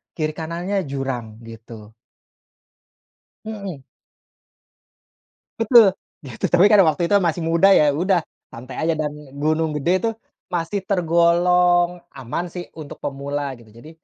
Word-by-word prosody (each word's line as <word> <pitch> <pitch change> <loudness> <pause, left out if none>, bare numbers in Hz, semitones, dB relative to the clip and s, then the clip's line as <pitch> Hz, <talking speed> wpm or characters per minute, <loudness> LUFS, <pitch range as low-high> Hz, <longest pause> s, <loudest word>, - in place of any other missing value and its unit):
kiri 155 -2 -1
kanannya 170 +5 -4
jurang, 130 -5 -5
gitu. 110 -1 -12 1.5
Mhm. 200 -9 -7 1.8
Betul. 225 -2 +6 0.3
Ya 130 -5 -10
itu - - 0
tapi 180 +4 +5
waktu 175 -7 +4
itu - - +3
masih 170 -2 -1
muda, 165 +4 +3
ya 150 -1 +5
udah 175 +4 +1 0.3
santai 125 +3 -10
aja, 165 - +2
dan 150 -1 -1 0.2
Gunung 155 +2 0
Gede 150 +4 0
itu 230 - +1 0.4
masih 175 +3 -2
tergolong 175 -1 +2 0.2
aman 135 +6 -4
sih 175 +1 -7
untuk 155 -3 -10
pemula 140 0 -4
gitu, 115 -2 -18
jadi 115 +8 -14
165 Hz, 125 wpm, -21 LUFS, 140-180 Hz, 1.8 s, Betul